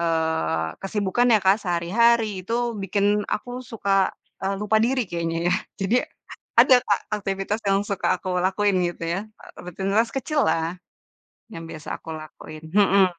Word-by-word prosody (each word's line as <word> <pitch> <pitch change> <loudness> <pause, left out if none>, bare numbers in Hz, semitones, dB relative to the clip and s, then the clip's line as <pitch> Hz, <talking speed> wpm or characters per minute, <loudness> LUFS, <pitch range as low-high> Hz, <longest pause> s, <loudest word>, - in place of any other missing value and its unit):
eee, 160 - 0
kesibukan 205 +4 0
ya - - +6
Kak, 190 +2 +5
sehari-hari 215 +7 +3 0.2
itu 230 - -1 0.3
bikin 200 +1 0 0.3
aku 245 - -6 0.2
suka 210 -3 -3 0.7
lupa, 210 +1 +2
eee, 225 - +4
diri 260 -1 +1
kayaknya 165 -1 -2
ya. 180 - +3 0.3
Jadi 195 +5 +2 0.6
ada 260 - +7
Kak, 205 - +2 0.2
aktivitas 195 +2 -2
yang 195 0 +3
suka 200 -2 -2
aku 185 - -7 0.2
lakuin 195 +1 +2
gitu 175 - -8
ya, 190 - -2 0.2
e - - -14 0.2
rutinitas 195 +6 0
kecil 290 +3 0
lah, 165 +2 0 0.8
yang 165 - -7
biasa 155 -1 -8
aku - - -13
lakuin, 155 0 -11
mhm. 200 -1 +5
195 Hz, 150 wpm, -24 LUFS, 170-210 Hz, 0.8 s, ada